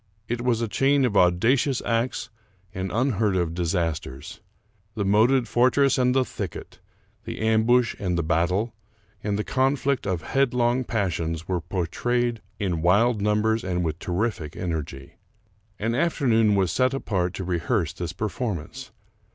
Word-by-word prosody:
It 120 0 -2
was 120 -2 +1
a 115 - 0
chain 135 +4 +2
of 110 -5 -1
auda 90 +8 +4
cious 135 -1 0
acts 120 0 -1 0.4
and 95 0 -4
unheard 110 -4 +1
of 85 -3 0
disasters. 80 -2 -3 0.6
The 100 - -1
moated 115 +5 +3
fortress 130 +2 +3
and 125 0 +2
the 130 -1 +3
thicket, 100 -8 -7 0.5
the - - -6
ambush 110 +2 +3
and 90 -4 -1
the 85 - 0
battle, 90 +8 0 0.5
and 100 -1 -1
the 105 - -1
conflict 135 -1 0
of 90 -5 -2
headlong 125 -2 +1
passions, 85 -7 -2
were 90 -2 -1
portrayed 115 +8 -1 0.2
in 90 -6 -1
wild 105 +6 +3
numbers 105 +2 +1
and 90 -1 -1
with 80 +1 -3
terrific 90 -5 -2
energy. 75 -6 -5 0.6
An 115 +2 -1
afternoon 120 -8 +2
was 95 -4 +1
set 130 +7 +1
apart 95 -8 -1
to 95 - -4
rehearse 85 - -1
this 85 -2 -5
performance. 105 - -4
105 Hz, 145 wpm, -25 LUFS, 90-120 Hz, 0.6 s, auda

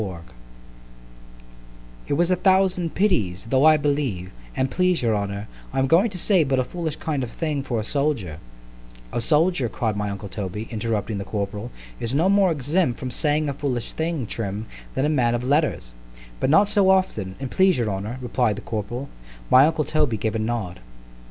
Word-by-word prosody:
XLIII 95 -5 -4 1.9
IT - - -1
was 170 +4 +2
a - - +4
thousand 185 -2 +2
pities——though 115 - +1
I 155 0 +7
believe, 140 -11 -1 0.2
an' 130 - 0
please 180 -2 +1
your 115 -2 +2
honour, 100 0 -3 0.2
I 135 - -5
am 135 - +3
going 175 - +4
to 190 - -5
say 180 -1 +3
but 135 -2 0
a 130 - +2
foolish 160 +2 -4
kind 150 -4 -2
of 125 - -3
a - - -15
thing 155 -4 -2
for 120 -4 -2
a - - -2
soldier—— 120 - -1 0.7
A - - -1
soldier, 150 -2 +2
cried 110 -2 -2
my 105 0 -2
uncle 100 +1 -6
Toby, 100 +2 -5
interrupting 110 -2 -2
the - - -3
corporal, 105 +2 -4 0.3
is 115 +3 -2
no 165 +6 +3
more 195 -2 +4
exempt 150 -1 0
from 130 - -5
saying 150 +3 +1
a 140 - -1
foolish 130 -4 -3
thing, 160 -5 -2
Trim, 105 -1 -4 0.3
than 135 - +1
a - - +3
man 125 -6 +2
of 120 - -3
letters——But - - -2
not 200 +8 +5
so 200 -2 +3
often, 150 - +1
an' 135 -1 -4
please 190 +3 +3
your 115 -4 0
honour, 100 +6 -4
replied 120 -3 +1
the - - -8
corporal——my 105 - 0
uncle 160 -2 0
Toby 150 -7 +1
gave 110 +1 -1
a 115 - -1
nod. 110 -5 -3
130 Hz, 185 wpm, -23 LUFS, 105-155 Hz, 1.9 s, I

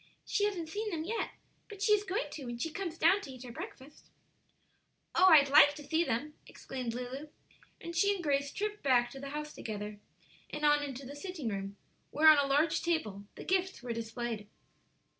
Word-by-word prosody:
She 410 - +1
hasn't 365 -6 -2
seen 425 +5 -3
them 325 -5 -3
yet, 450 +7 -2 0.4
but 410 -2 -10
she 405 +2 +2
is 415 -1 +3
going 375 -7 -2
to 280 - -7
when 240 -1 -5
she 320 +7 -3
comes 340 -2 -4
down 360 +6 +4
to 290 - -9
eat 255 -1 -10
her 245 - -8
breakfast." 265 +4 -10 1.0
"Oh, 370 - +5
I'd 300 -6 +7
like 290 0 +8
to 295 - -9
see 320 +3 +1
them!" 285 +2 -2
exclaimed 250 -3 -5
Lulu, 255 +4 -5 0.5
and 340 0 -7
she 400 +4 +4
and 365 - -6
Grace 280 -2 +1
tripped 420 0 -3
back 245 -3 +3
to 270 - -9
the 275 0 -6
house 300 +1 -5
together, 210 -1 -6 0.5
and 300 0 -2
on 295 0 +5
into 275 -1 -6
the 280 +3 -8
sitting 310 -5 -5
room, 195 0 -5 0.3
where, 310 +2 +3
on 305 -2 +8
a 280 - +2
large 295 +4 +2
table, 220 - -1
the - - -8
gifts 375 -5 0
were 240 -2 -3
displayed. 230 -1 -4
295 Hz, 200 wpm, -32 LUFS, 250-340 Hz, 1.0 s, like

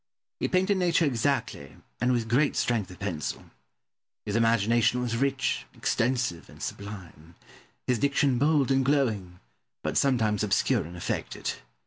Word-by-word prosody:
He - - 0
painted 190 +2 +2
nature 170 -2 +3
exactly, 140 +1 -1 0.2
and 125 +2 +2
with 120 -3 0
great 135 +6 +2
strength 115 -6 0
of 90 - -11
pencil. 85 -7 -4 0.7
His 105 - -2
imagination 115 +1 +3
was 120 -2 -1
rich, 130 - 0
extensive, 120 -7 -1
and - - -15
sublime: 90 -6 -8 0.5
his 125 -3 +1
diction 140 -2 +2
bold 145 -2 +3
and 135 0 +3
glowing, 110 -11 0 0.4
but - - -1
sometimes 115 -6 +2
obscure 105 -5 +1
and 85 +2 -9
affected. 85 - -3
120 Hz, 135 wpm, -27 LUFS, 100-135 Hz, 0.7 s, nature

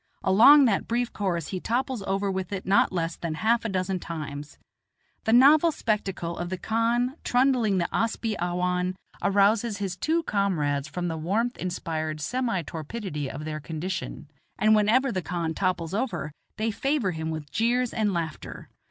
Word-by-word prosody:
Along 255 +10 +7
that 210 -5 +1
brief 240 +1 -1
course 175 -6 -2
he 185 - -3
topples 250 +2 -1
over 195 +1 0
with 190 -1 -4
it 195 -1 -4
not 195 +2 +3
less 170 -2 -2
than 165 -2 -4
half 230 +7 +2
a - - 0
dozen 185 -1 -1
times. 150 -4 -7 0.7
The 220 - +2
novel 290 +7 +6
spectacle 195 - -2
of 175 0 -3
the 185 - -3
khan 235 - 0
trundling 245 -5 +2
the 170 -1 +1
asp 230 +1 -1
i 220 - +1
awhan 180 +1 0 0.3
arouses 205 +2 +2
his 195 -2 -3
two 325 - 0
comrades 155 - 0
from 175 +5 -3
the 165 -1 -3
warmth 210 +10 -1
inspired 160 -4 -3
semi 230 - -1
torpidity 155 - -5
of 145 +4 -7
their 155 -1 -4
condition, 160 0 -5 0.3
and 215 +2 +4
whenever 235 +5 +3
the 185 - -2
khan 170 -2 -3
topples 180 -2 -1
over, 215 -8 -2 0.3
they 220 +1 0
favor 270 -3 0
him 160 -1 -4
with 155 -2 -6
jeers 240 +2 +1
and 215 -2 +1
laughter. 165 -4 -5
190 Hz, 170 wpm, -26 LUFS, 170-230 Hz, 0.7 s, Along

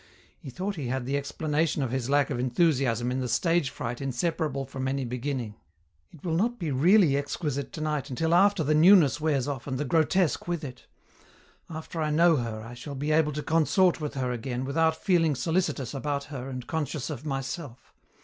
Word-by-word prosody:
He - - -9
thought 190 +8 -4
he 140 -5 -3
had 130 0 -2
the 135 +2 -1
explanation 150 +1 -1
of 125 - -2
his 130 -1 -2
lack 145 0 +2
of 120 - -2
enthusiasm 125 -3 +1
in 130 - -1
the 130 - -2
stage 165 +3 +2
fright 120 0 -5
inseparable 140 +1 -2
from 130 0 -4
any 135 0 -1
beginning. 125 -2 -3 0.6
"It 165 - -15
will 165 - -1
not 230 +8 +1
be 165 -7 -3
really 165 +3 +5
exquisite 140 -1 -3
tonight 155 -3 -3
until 160 +6 0
after 195 0 +4
the 155 +1 +2
newness 165 -2 +6
wears 145 -5 +1
off 140 -3 -4
and 130 -2 -2
the 150 - -2
grotesque 165 +4 +1
with 170 -2 -2
it. 130 -3 -9 0.8
After 160 +1 -6
I 155 - 0
know 165 +1 +4
her 115 -3 -4
I 115 +2 -9
shall 140 +4 -8
be 145 +3 -2
able 155 -1 +3
to 150 +1 -4
consort 165 +2 +2
with 150 -1 -4
her 130 -2 -1
again 125 +1 -3
without 160 +3 +2
feeling 165 -4 +2
solicitous 155 -5 -1
about 140 +1 -2
her 130 0 -5
and 125 -2 -6
conscious 150 -2 -3
of 140 -2 -6
myself. 135 -2 -5
145 Hz, 195 wpm, -27 LUFS, 130-160 Hz, 0.8 s, newness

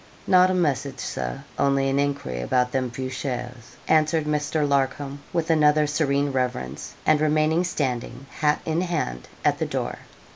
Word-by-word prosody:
'Not 185 0 +5
a 185 - +1
message, 140 -6 0
Sir; - - -4 0.2
only 140 -1 +2
an 135 +1 +1
enquiry 140 - -2
about 125 - +1
them 130 -1 0
few 130 +2 -4
shares,' 125 -3 -5
answered 155 0 +3
Mr. 150 0 0
Larcom, 140 0 0
with 165 -1 0
another 150 -1 +4
serene 145 -1 +1
reverence, 125 - -3
and 150 - +4
remaining 155 +2 +2
standing, 130 -6 -3
hat 150 -1 +2
in 160 +2 0
hand, 110 - -2 0.2
at - - +3
the - - 0
door. - - -3
140 Hz, 155 wpm, -24 LUFS, 130-155 Hz, 0.2 s, Not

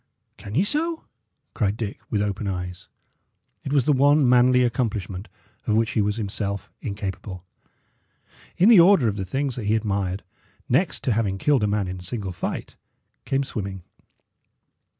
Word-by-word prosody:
"Can 100 +2 -8
ye 170 - +4
so?" 320 +8 -1 0.5
cried 105 -2 0
Dick, 105 -3 -4
with 105 -2 +1
open 105 0 -3
eyes. 90 -2 -5 0.8
It 135 - -4
was 140 -4 +3
the 150 - +4
one 140 +1 +4
manly 125 +1 +5
accomplishment 105 -6 -2 0.4
of 110 - +2
which 115 0 +2
he 110 - +1
was 105 0 0
himself 100 -2 -4
incapable. 100 -3 -5 1.1
In 185 - +5
the 225 -5 +9
order 170 -7 +6
of 105 -1 -1
the 95 - -3
things 135 +6 -2
that 115 - -4
he 110 - +3
admired, 100 -3 -1 0.4
next 145 +8 +1
to 130 - +1
having 105 -3 0
killed 140 +4 +2
a 105 - +2
man 100 -1 0
in 90 0 -5
single 95 +1 -5
fight 85 - -5 0.5
came 135 +1 +1
swimming. 100 -7 -5
110 Hz, 160 wpm, -24 LUFS, 100-130 Hz, 1.1 s, the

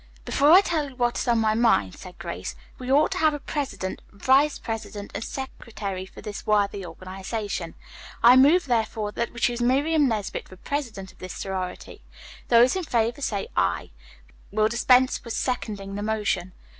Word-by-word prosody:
"Before 290 +2 +3
I 365 +3 +9
tell 315 -7 -1
you 265 - -15
what 240 -1 0
is - - -3
on 235 -1 +3
my 220 -1 +2
mind," 220 - +3
said 180 -1 -12
Grace, - - -6 0.2
"we 255 0 -4
ought 295 +3 +4
to - - -2
have 310 -1 +3
a - - -5
president, 220 -11 -4
vice 270 +8 +3
president 215 -2 -6
and - - -4
secretary 210 -8 -6
for - - -13
this 210 -2 -7
worthy 205 -2 +1
organization. 185 +1 -5 0.5
I 240 +2 +9
move 295 +8 +6
therefore 220 -4 -1
that 235 +2 -2
we 235 - -9
choose 240 0 +1
Miriam 285 +5 +3
Nesbit 215 -5 -3
for 185 - -11
president 225 -6 -4
of - - -25
this 185 -1 -7
sorority. 190 -2 -5 0.5
Those 240 +4 +5
in 375 - -2
favor 235 -1 0
say 205 -7 -2
'aye.' 85 -1 0 0.6
We'll 215 +1 +2
dispense 250 +2 +3
with 235 - -5
seconding 205 -6 -3
the 205 - -4
motion." 205 -4 -1
225 Hz, 175 wpm, -25 LUFS, 200-260 Hz, 0.6 s, I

